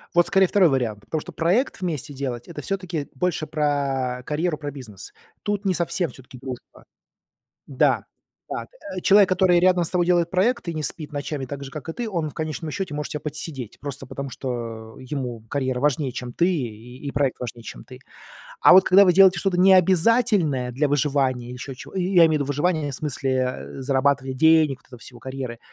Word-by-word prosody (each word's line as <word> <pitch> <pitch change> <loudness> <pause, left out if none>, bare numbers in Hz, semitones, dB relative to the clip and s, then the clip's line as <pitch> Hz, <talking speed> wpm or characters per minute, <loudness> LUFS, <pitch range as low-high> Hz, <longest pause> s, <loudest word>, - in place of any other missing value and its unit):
Вот 175 - +5
скорее 195 0 +4
2 185 -4 +4
вариант, 115 -6 -1
потому 155 -2 -3
что - - -9
проект 190 +9 0
вместе 155 -4 -3
делать- 130 -3 -5
это 170 - -7
всё-таки 185 -6 -4
больше 165 0 -1
про 140 -4 -1
карьеру, 155 +1 -1
про 145 -1 -4
бизнес. 120 -8 -11 0.3
Тут 205 -1 -2
не 190 - +2
совсем 175 0 -1
всё-таки 130 0 -14
дружба. 130 -1 -9 0.8
Да, - - +1 0.4
да, - - -4 0.3
э, - - -3
человек, 200 -1 +6
который 185 -1 +3
рядом 180 -1 +4
с - - -4
тобой 175 -2 +1
делает 175 -1 +2
проект 205 +1 +1
и - - -3
не 155 - -3
спит 155 0 -5
ночами 145 -1 -4
так 140 +1 -7
же, - - -8
как 150 +2 -8
и 165 - -3
ты, 235 -2 -4
он 165 -5 -2
в - - -14
конечном 155 0 -4
счёте 190 -4 -4
может 150 0 -4
тя 150 - -3
подсидеть, 145 -5 -6
просто, 140 -2 -6
потому 140 -1 -6
что 115 -4 -6
ему 130 -4 -5
карьера 130 -2 -1
важнее, 145 -3 +1
чем 125 -2 -5
ты, 170 +7 +2
и 125 -2 -5
проект 140 -3 0
важнее, 120 -1 -6
чем - - -9
ты. - - -13 0.6
А - - +7
вот 185 +1 +8
когда 195 +2 +7
вы 180 - +5
делаете 190 0 +6
что-то 190 -3 0
необязательное 185 - +4
для 140 +5 0
выживания, 135 -4 0
ещё 125 +2 -7
чего 125 - -12
я 180 -2 +4
имею - - 0
в 155 - +1
виду 145 -2 0
выживание, 145 +1 0
в - - -5
смысле, 140 -1 -3
э, 130 +1 -3
зарабатывания 135 0 +1
денег, 155 -2 +4
вот - - -28
этого 125 -2 -13
всего, 120 0 -13
карьеры, 130 -2 -6
145 Hz, 200 wpm, -23 LUFS, 130-175 Hz, 0.8 s, вот